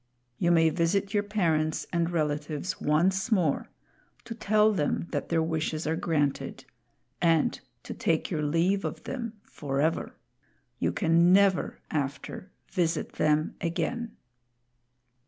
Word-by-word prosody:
You 175 - +2
may 165 -2 +5
visit 190 +4 0
your 205 - +3
parents 165 -7 0
and 170 -1 +1
relatives 150 +1 -2
once 185 +9 +2
more, 175 -9 +1 0.6
to 230 - -5
tell 215 -1 +3
them 150 -2 0
that - - -3
their 165 -1 +2
wishes 160 -1 -2
are 160 +1 0
granted 145 -4 -1 0.6
and 165 -3 +3 0.2
to - - -6
take - - 0
your 155 - -1
leave 165 +6 +1
of - - -4
them 235 -4 -4
forever. 145 +3 -2 0.6
You - - +1
can 170 -1 +3
never, 195 -1 +3
after, 145 +5 -4 0.2
visit 170 -4 -1
them 155 0 +1
again." 220 +7 -2
165 Hz, 125 wpm, -28 LUFS, 155-195 Hz, 0.6 s, may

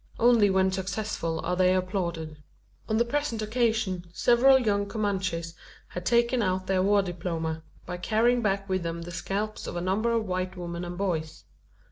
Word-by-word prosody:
Only 230 -3 +5
when 190 0 +3
successful 190 -3 -2
are 180 - 0
they 185 0 +4
applauded. 170 -4 -2 0.5
On 220 - +2
the 235 - +3
present 235 -4 -1
occasion 220 -5 0
several 245 +7 +5
young 205 -5 +1
Comanches 190 -6 -2 0.4
had 180 0 -5
taken 235 +1 +3
out 185 -2 0
their 190 -1 +1
war 200 +1 +3
diploma, 165 -3 -3 0.2
by 180 0 -5
carrying 230 +6 +2
back 195 -2 0
with 185 -1 0
them 170 0 -4
the 175 - -8
scalps 195 +5 -3
of - - -5
a - - -1
number 195 +6 0
of 230 -1 +1
white 185 0 -3
women 175 0 -5
and 175 0 -6
boys. 165 -5 -2
190 Hz, 170 wpm, -27 LUFS, 175-220 Hz, 0.5 s, Only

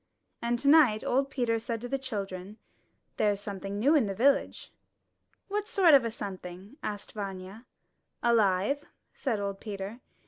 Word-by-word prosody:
And 235 +1 0
tonight 280 -5 +5
old 270 +2 +1
Peter 235 -4 0
said 230 0 -3
to 245 - -4
the 275 +2 -2
children, 200 -5 -5 0.6
^^There's 205 -2 +2
something 200 -1 -5
new 270 +9 +4
in 280 -9 +4
the 195 - -3
village.'' 275 +7 +1 0.8
*'What 415 +1 -2
sort 360 -6 +5
of 275 -3 +7
a 230 - -1
something?'* 195 +1 -8
asked 205 -1 -5
Vanya. 195 +2 -7 0.6
''Alive," 220 +3 +3 0.3
said 235 -7 -2
old 200 -1 -3
Peter. 205 +2 -6
220 Hz, 145 wpm, -29 LUFS, 200-260 Hz, 0.8 s, of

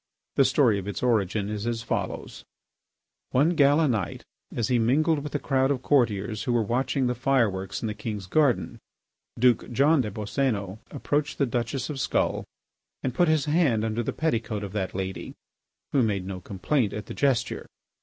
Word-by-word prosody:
The 135 - +4
story 125 -6 +3
of 95 - -7
its 100 - -4
origin 105 -4 +1
is 105 +1 -3
as 115 -1 -2
follows: - - -4 0.9
One 140 +6 +3
gala 150 -1 +4
night, 110 -9 -2 0.3
as 115 -3 -1
he 125 -2 +3
mingled 150 +7 +2
with 150 +1 -6
the - - 0
crowd 135 -1 +1
of 130 -3 -1
courtiers 110 -6 +1
who 125 - +1
were 115 -2 +2
watching 130 +4 0
the 125 - +1
fire 130 -1 +2
works 95 +1 -5
in - - 0
the 105 - -2
king's 105 -2 -5
garden, 140 +5 +1 0.6
Duke 125 0 +3
John 140 +4 +4
des 110 - -3
Boscénos 105 -1 -2
approached 145 +1 -1
the 140 - +2
Duchess 120 +2 -2
of 140 - -5
Skull - - 0 0.6
and 130 - -1
put 175 +7 +3
his 155 -3 +2
hand 145 -9 +2
under 110 +1 -1
the 115 - -2
petticoat 115 -9 -1
of 100 -1 -6
that 95 -4 -3
lady, 95 0 -4 0.6
who 140 - +3
made 100 -5 0
no 95 -1 -5
complaint 100 +5 -1
at 105 - -5
the - - -7
gesture. 135 -5 0
120 Hz, 185 wpm, -26 LUFS, 105-140 Hz, 0.9 s, The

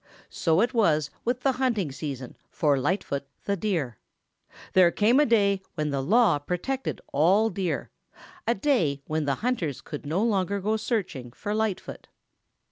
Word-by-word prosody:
So 165 +2 +2
it 245 +3 +1
was 155 - +2
with 245 +1 -1
the 270 - +3
hunting 220 - +1
season 135 -3 -6
for 145 -3 +2
Lightfoot 140 -3 -1 0.2
the 200 - +1
Deer. 165 - -2 0.7
There 185 -2 +6
came 220 +9 +3
a 295 - +4
day 200 -4 +3
when 150 -2 -1
the 140 -1 -1
law 200 - +4
protected 180 - -3
all 195 +10 +4
Deer, 190 -4 -2 0.6
a 235 - +3
day 185 - +1
when 155 -1 -1
the 140 -1 +1
hunters 175 - -1
could 145 0 -8
no 175 +8 +1
longer 200 -3 +1
go 210 +3 0
searching 190 - -3
for 205 - -4
Lightfoot. 215 -3 -3
190 Hz, 155 wpm, -26 LUFS, 150-220 Hz, 0.7 s, There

